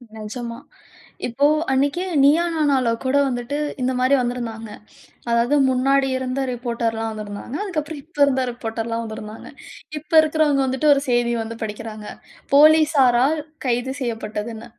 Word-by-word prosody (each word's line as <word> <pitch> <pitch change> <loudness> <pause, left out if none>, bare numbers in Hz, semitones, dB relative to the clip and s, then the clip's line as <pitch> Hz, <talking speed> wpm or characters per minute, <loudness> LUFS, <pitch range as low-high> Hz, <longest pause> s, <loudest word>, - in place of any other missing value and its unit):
நெஜமா. 230 +2 -6 0.7
இப்போ 260 +4 +1 0.3
அன்னைக்கே 285 +7 +1 0.2
"நீயா 310 +5 +5
நானால" 280 -5 +2 0.2
கூட 260 +2 +1
வந்துட்டு, 245 +2 -3 0.3
இந்த 255 +1 +1
மாரி 255 +2 +3
வந்துருந்தாங்க. 235 -3 -4 0.6
அதாவது 235 +4 +2
முன்னாடி 270 +1 +2
இருந்த 260 +1 -3
ரிப்போர்டர்லாம் 230 -2 -2
வந்திருந்தாங்க. 215 +4 -7
அதுக்கு 370 -7 -2
அப்புறம் 300 0 -8
இப்ப 325 -1 -21
இருந்த 265 -2 +1
ரிப்போர்டர்லாம் 230 -1 -4
வந்திருந்தாங்க. 220 0 -8 0.5
இப்ப 305 +2 -19
இருக்கிறவங்க 305 -3 +2
வந்துட்டு 265 +4 0
ஒரு 280 -1 +2
செய்தி 240 -1 +2
வந்து 225 +1 -7
படிக்கிறாங்க. 215 0 -6 0.5
"போலீஸாரால் 295 -2 +5 0.3
கைது 245 +2 -1
செய்யப்பட்டதுன்னு." 225 -1 -5
250 Hz, 125 wpm, -21 LUFS, 230-280 Hz, 0.7 s, நீயா